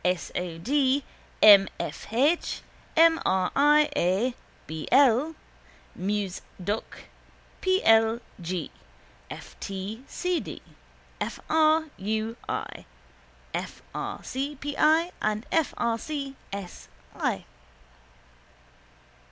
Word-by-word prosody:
S. 180 -1 0
O. 175 -2 -3
D., 270 - +2 0.4
M. 200 -2 +9
F. - - -5
H., 285 +9 +1 0.4
M. 330 0 +6
R. 185 -1 +1
I. 295 +1 +5
A., 195 +8 +1 0.3
B. 155 0 -6
L., 275 +4 +5 0.6
Mus. 195 -1 -2 0.2
Doc., 205 +4 -4 0.6
P. 375 0 +2
L. 225 +1 +5 0.2
G., 175 -2 -3 0.6
F. - - -9
T. 195 +5 -5
C. 360 -2 -1
D., - - -7 0.6
F. - - -3
R. 315 0 +4
U. 220 +3 -2
I., - - -4 0.7
F. - - -5
R. - - -5
C. 275 +3 -3
P. 285 +1 -5
I. 320 +3 +4
and 215 +1 -1
F. 325 -4 +2
R. 230 -1 0
C. 280 0 -5 0.2
S. 195 -3 -7 0.3
I. - - -1
235 Hz, 110 wpm, -27 LUFS, 195-295 Hz, 0.7 s, M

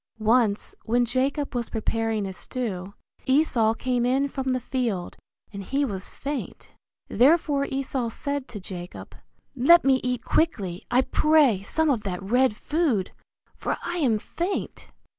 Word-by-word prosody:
Once 220 -1 +2
when 240 +2 +2
Jacob 270 +4 -1
was 240 -2 -2
preparing 225 -1 -1
a 190 - -5
stew, 200 -4 -5 0.3
Esau 260 -6 +3
came 250 0 -1
in 265 +3 +2
from 270 -1 -5
the 255 -1 +1
field, 235 -7 -2 0.4
and 200 - -5
he 280 +8 0
was 195 -6 -5
faint; 285 0 -6 0.4
therefore 280 +2 +3
Esau 265 -3 -2
said 280 +3 -4
to 215 - -8
Jacob, 180 -2 -8 0.4
Let 320 +7 +6
me 265 -1 +4
eat 250 0 -2
quickly, 195 - 0
I 250 - +4
pray, 295 -12 +3
some 310 +9 +1
of 240 -5 0
that 185 -3 -4
red 245 +3 +2
food, 290 - 0 0.4
for - - -3
I 345 0 -3
am 255 -10 +2
faint. 345 - -4
250 Hz, 145 wpm, -25 LUFS, 215-280 Hz, 0.4 s, Let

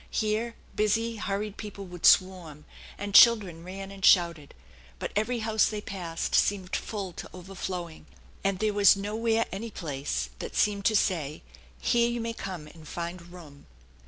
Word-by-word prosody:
Here 220 +2 -1 0.2
busy, 225 +2 0
hurried 205 0 -3
people 205 -2 -7
would 180 -2 0
swarm, 175 -6 +3 0.3
and 205 0 -5
children 200 -8 +6
ran 195 +2 -7
and 195 -1 -11
shouted; 170 -6 +4 0.4
but - - -4
every 225 +3 0
house 220 -2 +3
they 215 - -3
passed 175 -5 -5
seemed 190 -2 +2
full 195 -5 -4
to - - -8
overflowing, 180 -3 -6 0.4
and 195 -1 +1
there 215 +1 0
was 205 0 +6
nowhere 225 +3 0
any 215 +4 -5
place 140 - -3
that - - -6
seemed 200 -1 +1
to 220 - +3
say, 160 -8 0 0.2
" - - -26
Here 235 -1 +2
you 240 0 -2
may 230 0 -3
come 185 -8 -6
and 155 0 -14
find 170 +1 -6
room!" 155 -6 -13
195 Hz, 160 wpm, -28 LUFS, 170-215 Hz, 0.4 s, children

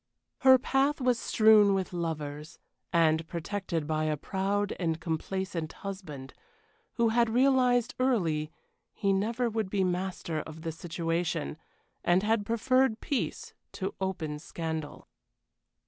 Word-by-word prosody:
Her 260 -1 +7
path 270 +4 +1
was 250 -3 +2
strewn 215 -2 +5
with 190 -1 -2
lovers, 155 -3 -4 0.3
and 160 -1 +3
protected 170 -1 -3
by 155 0 0
a 155 -1 0
proud 200 +5 -1
and 165 -3 -1
complacent 165 0 -3
husband, 170 -10 -7 0.6
who 235 -1 +2
had 235 0 +3
realized 250 -1 +3
early 165 -12 +1 0.4
he 200 -2 +1
never 230 +5 0
would 220 -3 -2
be 195 -1 +1
master 180 -3 -2
of 160 +1 -8
the 165 - -2
situation, 165 -1 -2 0.5
and 175 +2 +3
had 215 -1 +1
preferred 255 +1 +2
peace 280 - -3 0.2
to 190 - -3
open 165 -6 -3
scandal. 160 -2 -5
190 Hz, 125 wpm, -29 LUFS, 160-225 Hz, 0.6 s, Her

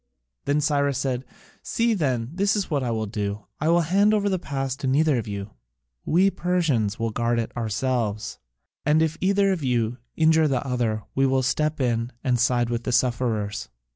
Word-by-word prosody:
Then 145 +1 +1
Cyrus 140 -2 +1
said, 130 -2 -1 0.4
"See, 230 0 +1
then, 130 - -1
this 200 +4 +1
is 200 -4 -2
what 145 -2 +1
I 125 - -1
will 110 -1 -1
do: 105 -1 -4
I 155 - +1
will 170 +1 +4
hand 200 +6 +3
over 205 -1 +1
the 190 -2 0
pass 135 -4 -3
to 140 - -3
neither 145 0 +3
of 110 - -6
you: 100 0 -5 0.5
we 190 +5 +3
Persians 155 - 0
will 115 0 -1
guard 120 +1 0
it 115 - -3
ourselves, 110 -2 -2 0.4
and 155 +2 +3
if 160 0 -1
either 195 +1 +3
of 175 -6 -2
you 120 -1 0 0.2
injure 160 0 +4
the 135 -2 -1
other, 120 -5 -1
we 135 0 +2
will 130 0 +1
step 150 +4 0
in 120 -2 0
and 125 -2 +1
side 120 0 +2
with 120 0 -2
the - - -2
sufferers." 115 -4 0
130 Hz, 190 wpm, -24 LUFS, 115-160 Hz, 0.5 s, will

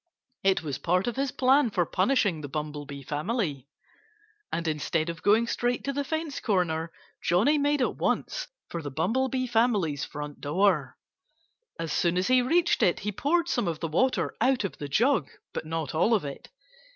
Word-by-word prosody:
It 195 -2 +3
was 145 -4 -4
part 180 +2 +1
of 240 - -2
his 275 +1 0
plan 265 +1 +4
for 180 -4 +1
punishing 185 - +1
the 145 - -5
Bumblebee 145 -2 -5
family. 150 - -2 0.8
And 170 0 -2
instead 155 +1 -1
of 165 -1 -6
going 220 +3 +4
straight 240 +1 -1
to 275 - -2
the 285 +1 -1
fence 315 0 -3
corner, 170 -6 0 0.3
Johnnie 230 - +3
made 290 -1 +2
at - - -1
once - - -1 0.2
for 170 - -4
the 145 - -5
Bumblebee 255 - 0
family's 220 - +1
front 150 0 -7
door. 150 -3 +1 0.8
As 165 -2 -3
soon 170 0 +1
as 185 +4 +1
he 255 0 +5
reached 340 +7 +2
it 175 - +3
he 210 - -2
poured 325 - +1
some 240 - 0
of 165 -2 -2
the 165 - -2
water 255 +12 +1
out 260 -3 +3
of 195 - -4
the 145 - -4
jug 230 - +2 0.2
but 155 - -4
not 165 0 -3
all 215 +9 +3
of 195 - -1
it. 140 - -8
190 Hz, 180 wpm, -27 LUFS, 155-255 Hz, 0.8 s, he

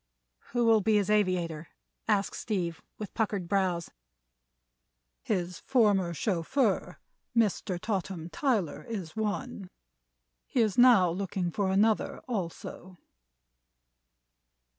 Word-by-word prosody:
"Who 240 -1 +2
will 225 -2 +5
be 215 +2 +2
his 210 0 +2
aviator?" 175 -6 +1 0.4
asked 205 -2 +1
Steve, 180 -6 -3 0.2
with 210 -3 -7
puckered 205 -5 -1
brows. 180 -3 0 1.3
"His 175 - -2
former 205 -9 +2
chauffeur, 205 - 0 0.4
Mr. 200 -4 +1
Totham 185 -5 -3
Tyler, 205 - 0
is 190 -8 -5
one. 215 -2 -3 0.8
He - - -1
is 215 -4 +1
now 235 -8 +6
looking 185 -1 -2
for 195 +3 0
another, 210 +3 +2
also." 185 -3 -5
195 Hz, 100 wpm, -29 LUFS, 175-220 Hz, 1.3 s, now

